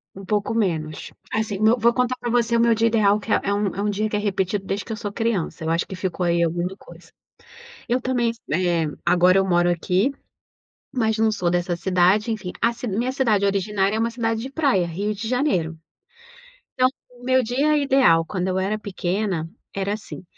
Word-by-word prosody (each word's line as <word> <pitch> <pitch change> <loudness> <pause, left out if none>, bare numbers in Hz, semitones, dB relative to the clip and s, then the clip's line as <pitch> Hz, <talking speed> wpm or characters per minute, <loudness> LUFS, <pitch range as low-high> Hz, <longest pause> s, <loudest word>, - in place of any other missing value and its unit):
Um 195 - -9
pouco 210 +2 -1
menos. 160 -9 -2 0.2
Assim, 220 -3 -2
no 220 +3 +4
vou 235 +1 +3
contar 250 0 0
pra 240 - -3
você 235 -1 +2
o - - +2
meu 235 0 +4
dia 225 +1 +2
ideal, 210 -2 +3
que - - -6
é - - +4
é 200 - 0
um 205 0 0
é 200 - -2
um 210 - 0
dia 215 +2 -1
que 210 - -3
é 210 - +1
repetido 195 -1 -1
desde 195 +1 -2
que - - -8
eu 220 - -3
sou 210 -3 -5
criança, 205 -7 -2
eu 160 - -2
acho 165 +1 +1
que 190 - -7
ficou 185 -1 -2
aí 170 0 +2
alguma 175 +3 -1
coisa. - - -16 0.8
Eu 245 +2 +2
também 245 -2 0 0.2
eh, 170 -1 +1 0.2
agora 180 +2 +4
eu 195 - +2
moro 175 -1 +3
aqui, 180 - +1 0.8
mas 220 -4 +1
não 220 0 +3
sou 180 -5 -1
dessa 175 0 0
cidade, 185 +5 +2
enfim, 205 -5 -4
a 235 - +3
ci 235 +1 -6
minha 235 +5 -1
cidade 225 -7 +2
originária 200 +1 0
é - - -1
uma 230 +1 0
cidade 225 -1 -1
de 260 - -5
praia, 270 - +2
Rio 200 +6 -2
de 210 +2 -6
Janeiro. 225 - 0 1.0
Então, 255 0 +3 0.2
o 245 0 -18
meu 260 +1 +3
dia 275 +6 +1
ideal, 265 - +4
quando 180 +1 -3
eu 185 0 0
era 200 +3 -1
pequena 190 -4 -2 0.3
era 195 +1 -1
assim: 215 -3 -8
205 Hz, 210 wpm, -23 LUFS, 185-230 Hz, 1.0 s, no